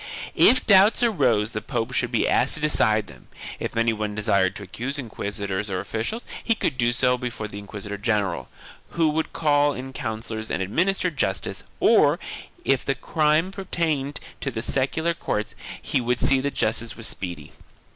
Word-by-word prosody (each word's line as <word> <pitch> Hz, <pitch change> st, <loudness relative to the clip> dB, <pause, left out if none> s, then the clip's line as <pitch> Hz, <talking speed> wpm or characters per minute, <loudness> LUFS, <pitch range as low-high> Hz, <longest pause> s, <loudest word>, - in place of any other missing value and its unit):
If 255 Hz, -, +6 dB
doubts 205 Hz, +4 st, +6 dB
arose 125 Hz, -, +2 dB
the 110 Hz, -, -3 dB
pope 115 Hz, -, -3 dB
should -, -, 0 dB
be -, -, +2 dB
asked -, -, +2 dB
to -, -, -2 dB
decide 110 Hz, -8 st, +2 dB
them; 65 Hz, -9 st, -15 dB, 0.3 s
if -, -, -4 dB
any 115 Hz, 0 st, +3 dB
one 105 Hz, -1 st, -3 dB
desired 100 Hz, -3 st, +2 dB
to 105 Hz, -, -7 dB
accuse 125 Hz, +8 st, -4 dB
inquisitors 100 Hz, -5 st, -4 dB
or 95 Hz, -1 st, -1 dB
officials, 110 Hz, -, -3 dB, 0.2 s
he 230 Hz, -, +2 dB
could 150 Hz, -, -1 dB
do 120 Hz, -1 st, +2 dB
so 125 Hz, +1 st, +2 dB
before 120 Hz, -3 st, -4 dB
the 100 Hz, -1 st, -7 dB
inquisitor 100 Hz, 0 st, -7 dB
general, 105 Hz, -2 st, 0 dB, 0.4 s
who 165 Hz, -2 st, +3 dB
would 160 Hz, +1 st, -1 dB
call 145 Hz, -2 st, +2 dB
in 130 Hz, 0 st, -7 dB
counsellors 110 Hz, -1 st, -5 dB
and -, -, -1 dB
administer 180 Hz, -, +1 dB
justice, 95 Hz, -, -2 dB
or, -, -, +5 dB, 0.5 s
if 135 Hz, -2 st, +2 dB
the 135 Hz, -, 0 dB
crime 155 Hz, +5 st, +2 dB
appertained 165 Hz, -7 st, -2 dB, 0.2 s
to 140 Hz, -, -2 dB
the 115 Hz, -3 st, -4 dB
secular 150 Hz, +6 st, 0 dB
courts, 105 Hz, -9 st, -3 dB, 0.3 s
he -, -, 0 dB
would 125 Hz, +1 st, 0 dB
see 135 Hz, -1 st, +3 dB
that 140 Hz, +1 st, -2 dB
justice 115 Hz, +1 st, -1 dB
was 115 Hz, -, -6 dB
speedy. 90 Hz, -5 st, -6 dB
120 Hz, 175 wpm, -24 LUFS, 105-150 Hz, 0.5 s, If